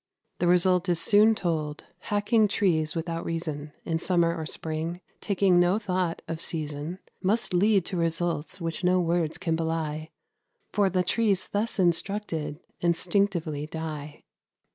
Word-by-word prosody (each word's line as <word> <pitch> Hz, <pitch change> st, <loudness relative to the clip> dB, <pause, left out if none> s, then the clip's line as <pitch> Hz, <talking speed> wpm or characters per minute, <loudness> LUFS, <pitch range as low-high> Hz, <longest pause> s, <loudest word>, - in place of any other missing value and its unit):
The 175 Hz, -, +2 dB
result 180 Hz, +1 st, +3 dB
is 175 Hz, -2 st, +2 dB
soon 215 Hz, +4 st, +5 dB
told: 155 Hz, -6 st, -2 dB
hacking 210 Hz, +1 st, +2 dB
trees 170 Hz, -7 st, +1 dB
without 165 Hz, 0 st, -3 dB
reason, 155 Hz, -3 st, -4 dB
In 165 Hz, -1 st, -1 dB
summer 170 Hz, -1 st, +2 dB
or 160 Hz, -2 st, -4 dB
spring 160 Hz, +3 st, -3 dB, 0.2 s
taking 190 Hz, -3 st, +3 dB
no 175 Hz, +3 st, +4 dB
thought 185 Hz, -5 st, -2 dB
of 165 Hz, 0 st, -4 dB
season 155 Hz, +1 st, -4 dB, 0.2 s
Must 205 Hz, +2 st, +1 dB
lead 195 Hz, 0 st, +3 dB
to 185 Hz, -, -3 dB
results 165 Hz, -1 st, -1 dB
which 165 Hz, +1 st, -4 dB
no 180 Hz, +1 st, +4 dB
words 170 Hz, -2 st, 0 dB
can 175 Hz, -3 st, -1 dB
belie; 160 Hz, -1 st, -2 dB, 0.6 s
For 200 Hz, -2 st, +3 dB
the 185 Hz, 0 st, +1 dB
trees 200 Hz, 0 st, +1 dB
thus 215 Hz, +3 st, -1 dB
instructed 170 Hz, -4 st, 0 dB, 0.2 s
instinctively 170 Hz, -3 st, 0 dB
die. 155 Hz, -2 st, -6 dB
170 Hz, 140 wpm, -27 LUFS, 160-190 Hz, 0.6 s, soon